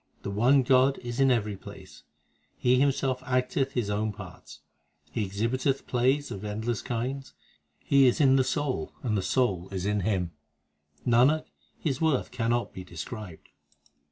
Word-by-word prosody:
The 100 Hz, -, -3 dB
one 125 Hz, +7 st, +4 dB
God 130 Hz, +2 st, +4 dB
is 120 Hz, 0 st, -5 dB
in 135 Hz, -1 st, +5 dB
every 105 Hz, -5 st, +1 dB
place; -, -, -12 dB, 0.6 s
He 125 Hz, +1 st, +3 dB
Himself 135 Hz, -2 st, +1 dB
acteth 130 Hz, +1 st, 0 dB
His 115 Hz, -5 st, -1 dB
own 105 Hz, +1 st, 0 dB
parts; 100 Hz, -3 st, -11 dB, 0.5 s
He 110 Hz, -, -1 dB
exhibiteth 115 Hz, +7 st, -1 dB
plays 130 Hz, +3 st, +1 dB
of 100 Hz, -, -6 dB
endless 110 Hz, +2 st, -2 dB
kinds: 130 Hz, +3 st, -4 dB, 0.4 s
He 140 Hz, -1 st, +4 dB
is 125 Hz, -, +2 dB
in 135 Hz, -3 st, +5 dB
the 130 Hz, -, +4 dB
soul, 145 Hz, 0 st, -2 dB
and 115 Hz, -4 st, 0 dB
the 100 Hz, -, +1 dB
soul 95 Hz, -6 st, 0 dB
is 95 Hz, -1 st, -4 dB
in 105 Hz, 0 st, +1 dB
Him; 95 Hz, -3 st, -1 dB, 0.7 s
Nanak, 130 Hz, +6 st, +4 dB, 0.3 s
His 145 Hz, 0 st, -2 dB
worth 160 Hz, -5 st, +1 dB
cannot 120 Hz, -1 st, -1 dB
be 95 Hz, -, -7 dB
described. 90 Hz, +2 st, -8 dB
120 Hz, 155 wpm, -28 LUFS, 105-130 Hz, 0.7 s, in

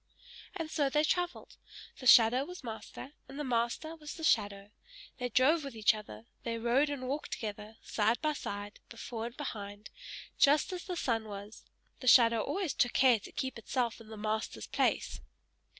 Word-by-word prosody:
And 330 Hz, -4 st, -4 dB
so 285 Hz, -3 st, +1 dB
they 300 Hz, +2 st, +2 dB
travelled; 355 Hz, +2 st, -2 dB, 0.4 s
the 255 Hz, -, -3 dB
shadow 240 Hz, +2 st, +7 dB
was 360 Hz, +2 st, -9 dB
master, 230 Hz, +3 st, -8 dB, 0.2 s
and 275 Hz, -, -10 dB
the 295 Hz, -, -2 dB
master 245 Hz, +5 st, -1 dB
was 300 Hz, -2 st, -8 dB
the 325 Hz, -, -9 dB
shadow; 205 Hz, -7 st, +1 dB, 0.5 s
they 250 Hz, 0 st, -2 dB
drove 290 Hz, +7 st, +4 dB
with 275 Hz, -4 st, -7 dB
each 215 Hz, -1 st, +4 dB
other, 115 Hz, -, -9 dB, 0.2 s
they 230 Hz, -1 st, -3 dB
rode 240 Hz, +6 st, +2 dB
and 265 Hz, -3 st, -4 dB
walked 285 Hz, +3 st, -3 dB
together, 215 Hz, 0 st, -6 dB
side 220 Hz, +2 st, +1 dB
by 305 Hz, -1 st, 0 dB
side, 205 Hz, -6 st, -6 dB
before 230 Hz, 0 st, -5 dB
and 240 Hz, -, -11 dB
behind, 205 Hz, -7 st, -6 dB, 0.5 s
just 295 Hz, +6 st, +4 dB
as 360 Hz, -, -6 dB
the 365 Hz, -, -4 dB
sun 230 Hz, -7 st, 0 dB
was; 205 Hz, +1 st, -9 dB, 0.3 s
the 255 Hz, -, -7 dB
shadow 230 Hz, -3 st, +7 dB
always 370 Hz, -, -2 dB
took 245 Hz, -, +1 dB
care 250 Hz, -4 st, +5 dB
to -, -, -12 dB
keep 260 Hz, -3 st, -4 dB
itself 235 Hz, 0 st, -2 dB
in 225 Hz, -, -14 dB
the 220 Hz, 0 st, -9 dB
master's 215 Hz, +1 st, -3 dB
place. -, -, 0 dB
240 Hz, 180 wpm, -32 LUFS, 220-290 Hz, 0.5 s, shadow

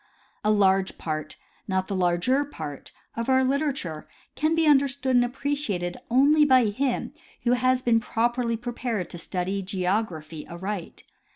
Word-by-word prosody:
A 210 Hz, -, +2 dB
large 195 Hz, -2 st, +3 dB
part, 155 Hz, -1 st, -4 dB, 0.3 s
not 190 Hz, -1 st, 0 dB
the 200 Hz, -, -3 dB
larger 185 Hz, +10 st, +2 dB
part, 155 Hz, -, -8 dB, 0.2 s
of 230 Hz, +2 st, -3 dB
our 260 Hz, 0 st, +4 dB
literature 265 Hz, -, -1 dB, 0.3 s
can 310 Hz, +2 st, +1 dB
be 325 Hz, -1 st, +2 dB
under 280 Hz, -2 st, +5 dB
stood 265 Hz, -1 st, -1 dB
and 245 Hz, -, +5 dB
appreciated 245 Hz, -9 st, -2 dB
only 285 Hz, +5 st, +5 dB
by 260 Hz, -4 st, +5 dB
him 245 Hz, +5 st, -1 dB, 0.3 s
who 240 Hz, -, +2 dB
has 255 Hz, +1 st, +2 dB
been 230 Hz, -1 st, +4 dB
jjroperly 230 Hz, +1 st, 0 dB
pre 240 Hz, 0 st, -5 dB
pared 230 Hz, -7 st, -3 dB
to 175 Hz, -, -7 dB
study 185 Hz, +3 st, -2 dB
geography 180 Hz, -5 st, -2 dB
aright. 185 Hz, +1 st, -5 dB
230 Hz, 155 wpm, -26 LUFS, 185-260 Hz, 0.3 s, under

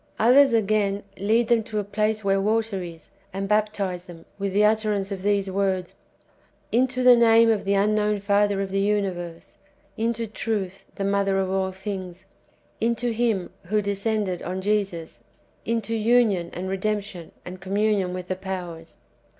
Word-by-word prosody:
Others, 265 Hz, +4 st, +6 dB
again, 205 Hz, -2 st, +1 dB, 0.2 s
lead 225 Hz, +4 st, +2 dB
them 235 Hz, -2 st, +3 dB
to 215 Hz, 0 st, -6 dB
a 210 Hz, -, 0 dB
place 215 Hz, +1 st, -1 dB
where 195 Hz, 0 st, +2 dB
water 215 Hz, -1 st, 0 dB
is, 165 Hz, -2 st, -10 dB, 0.2 s
and 195 Hz, +1 st, -3 dB
baptize 205 Hz, -4 st, 0 dB
them, 170 Hz, -2 st, -12 dB
with 200 Hz, 0 st, -1 dB
the 205 Hz, +2 st, +3 dB
utterance 210 Hz, -2 st, +1 dB
of 195 Hz, -2 st, -4 dB
these 200 Hz, 0 st, +1 dB
w^ords, 190 Hz, -2 st, -1 dB, 0.4 s
" -, -, -36 dB, 0.3 s
Into 255 Hz, +1 st, +1 dB
the 250 Hz, -1 st, +8 dB
name 230 Hz, -1 st, +5 dB
of 215 Hz, -3 st, -1 dB
the 200 Hz, +1 st, +2 dB
unknown 210 Hz, +1 st, +2 dB
Father 200 Hz, 0 st, +2 dB
of 195 Hz, -1 st, -4 dB
the 195 Hz, -, 0 dB
uni 200 Hz, -1 st, +1 dB
verse— 175 Hz, -2 st, -9 dB, 0.4 s
Into 230 Hz, 0 st, -1 dB
truth, 205 Hz, -3 st, -4 dB
the 195 Hz, -, -3 dB
mother 200 Hz, 0 st, +1 dB
of 190 Hz, -1 st, 0 dB
all 190 Hz, 0 st, 0 dB
things 190 Hz, -2 st, -7 dB, 0.3 s
— -, -, -37 dB
into 235 Hz, +1 st, 0 dB
Him 220 Hz, -6 st, 0 dB
who 210 Hz, +4 st, +1 dB
descended 200 Hz, -2 st, -1 dB
on 185 Hz, +1 st, -4 dB
Jesus 195 Hz, -4 st, -2 dB, 0.2 s
— -, -, -38 dB
into 230 Hz, -1 st, -1 dB
union, 220 Hz, -6 st, +2 dB
and 185 Hz, +2 st, -5 dB
redemption, 195 Hz, -2 st, -3 dB
and 180 Hz, 0 st, -8 dB
com 190 Hz, +2 st, -4 dB
munion 205 Hz, -3 st, +1 dB
with 180 Hz, 0 st, -6 dB
the 185 Hz, -, -2 dB
powers." 180 Hz, -4 st, -6 dB
200 Hz, 175 wpm, -24 LUFS, 190-215 Hz, 0.4 s, the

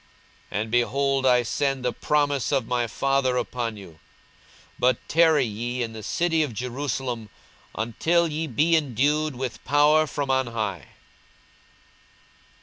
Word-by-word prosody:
42:024:049 105 Hz, -, -1 dB
And, 110 Hz, 0 st, -5 dB
behold, 135 Hz, +3 st, +1 dB
I 125 Hz, -1 st, +4 dB
send 135 Hz, +1 st, -1 dB
the 125 Hz, -, 0 dB
promise 145 Hz, 0 st, 0 dB
of 135 Hz, -4 st, +1 dB
my 120 Hz, -1 st, 0 dB
Father 135 Hz, +1 st, 0 dB
upon 120 Hz, -2 st, -3 dB
you: 85 Hz, -6 st, -13 dB, 0.8 s
but 125 Hz, -1 st, +3 dB
tarry 160 Hz, -4 st, +4 dB
ye 120 Hz, +3 st, -3 dB
in 115 Hz, -1 st, -5 dB
the 110 Hz, -, -8 dB
city 165 Hz, +7 st, 0 dB
of 140 Hz, -7 st, -2 dB
Jerusalem, 125 Hz, -2 st, -3 dB, 0.5 s
until 165 Hz, +10 st, +1 dB
ye 160 Hz, +1 st, -3 dB
be 155 Hz, +6 st, +2 dB
endued 150 Hz, +1 st, +1 dB
with 125 Hz, -1 st, -5 dB
power 150 Hz, +2 st, +4 dB
from 140 Hz, -2 st, -2 dB
on 130 Hz, -1 st, +1 dB
high. 110 Hz, -5 st, -4 dB
130 Hz, 140 wpm, -25 LUFS, 120-145 Hz, 0.8 s, I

